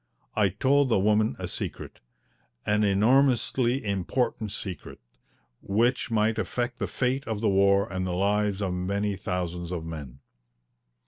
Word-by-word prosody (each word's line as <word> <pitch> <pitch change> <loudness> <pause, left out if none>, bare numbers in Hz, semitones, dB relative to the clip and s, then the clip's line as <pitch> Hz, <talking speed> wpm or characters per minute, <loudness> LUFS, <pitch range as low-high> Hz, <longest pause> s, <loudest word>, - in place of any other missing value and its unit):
I 105 -3 +3
told 135 +8 +2
the 115 - +3
woman 105 -4 +2
a - - -4
secret, - - -6 0.7
an 105 +1 +2
enormously 120 +4 +2
important 105 +3 -1
secret, 95 -3 -7 0.6
which 120 +7 +1
might 110 0 +1
affect 120 0 -2
the - - -1
fate 130 +2 -1
of 110 -2 -2
the 110 -1 +1
war 100 +1 +4
and 95 0 -2
the 90 - -2
lives 100 +1 +1
of 95 -2 -1
many 100 +3 -1
thousands 90 -2 -4
of 85 -3 -4
men. 75 -6 -7
105 Hz, 140 wpm, -27 LUFS, 95-120 Hz, 0.7 s, war